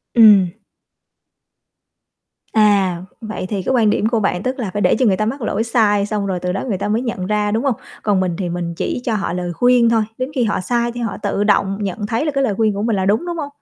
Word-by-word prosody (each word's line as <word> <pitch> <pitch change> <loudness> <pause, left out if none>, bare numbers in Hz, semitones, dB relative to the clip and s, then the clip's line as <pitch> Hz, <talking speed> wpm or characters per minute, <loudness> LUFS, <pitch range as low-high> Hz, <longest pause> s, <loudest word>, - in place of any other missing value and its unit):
Ừm. 210 -6 +7 2.0
À, 200 -4 +3 0.2
vậy 215 -4 -5
thì 200 -3 -2
cái 265 - 0
quan 225 -4 +3
điểm 210 - +1
của 230 0 +1
bạn 195 -3 -1
tức 260 +2 -2
là 220 -6 -2
phải 205 - -2
để - - +3
cho 255 - +3
người 190 -3 +3
ta 215 - 0
mắc 260 +5 -3
lỗi 220 0 -1
sai 210 -4 +2
xong 210 -1 -2
rồi 185 -2 -2
từ 180 0 -2
đó 190 - -3
người 205 -6 -1
ta 200 - -3
mới 215 +3 0
nhận 230 -7 -3
ra, 210 0 0
đúng 225 +3 0
hông? 270 -4 +1 0.3
Còn 205 -3 +2
mình 180 -2 -1
thì 185 -3 -3
mình 170 -1 -3
chỉ 245 - -3
cho 230 - 0
họ 200 -4 -2
lời 180 -1 -3
khuyên 245 +3 +4
thôi, 230 -1 +3 0.2
đến 255 +1 -3
khi 250 - +2
họ 215 - 0
sai 235 +5 0
thì 240 0 -6
họ 225 -4 -3
tự 205 - 0
động 195 -2 +2
nhận 205 +1 -3
thấy 230 +7 -1
là 300 - 0
cái 275 -1 0
lời 215 -7 0
khuyên 215 0 +1
của 200 - -3
mình 230 -2 +1
là 190 -1 0
đúng, 210 - +1
đúng 345 -1 -4
hông? 290 -3 -4
210 Hz, 265 wpm, -19 LUFS, 195-235 Hz, 2.0 s, Ừm